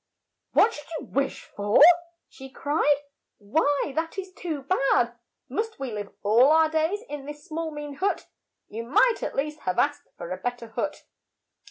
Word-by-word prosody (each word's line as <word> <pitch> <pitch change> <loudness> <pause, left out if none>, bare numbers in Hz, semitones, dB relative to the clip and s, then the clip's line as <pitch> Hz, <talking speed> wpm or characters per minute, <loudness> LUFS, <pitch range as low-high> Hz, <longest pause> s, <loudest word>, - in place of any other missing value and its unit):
"What 455 - +5
should 295 -1 -9
you - - -9
wish 275 0 -1
for?" 205 +1 +1 0.5
she 265 0 -12
cried. 290 +1 +1 0.4
"Why, 285 +6 0
that 325 +3 -2
is 380 -1 -5
too 320 -7 -5
bad! 270 -6 +2 0.3
Must 435 - -3
we 270 -3 -4
live 205 -2 -5
all 230 +6 +5
our 320 0 +5
days 320 +7 0
in 290 -1 -7
this 295 +2 -9
small 325 -1 -3
mean 295 -1 -6
hut? 395 +4 -1 0.4
You 225 +2 -6
might 440 - +3
at - - -3
least 300 +2 -2
have 185 -9 -2
asked 290 0 +1
for 170 - -7
a 185 - -2
bet 245 +5 -3
ter 230 -2 -11
hut. 225 - -3
290 Hz, 175 wpm, -26 LUFS, 245-320 Hz, 0.5 s, What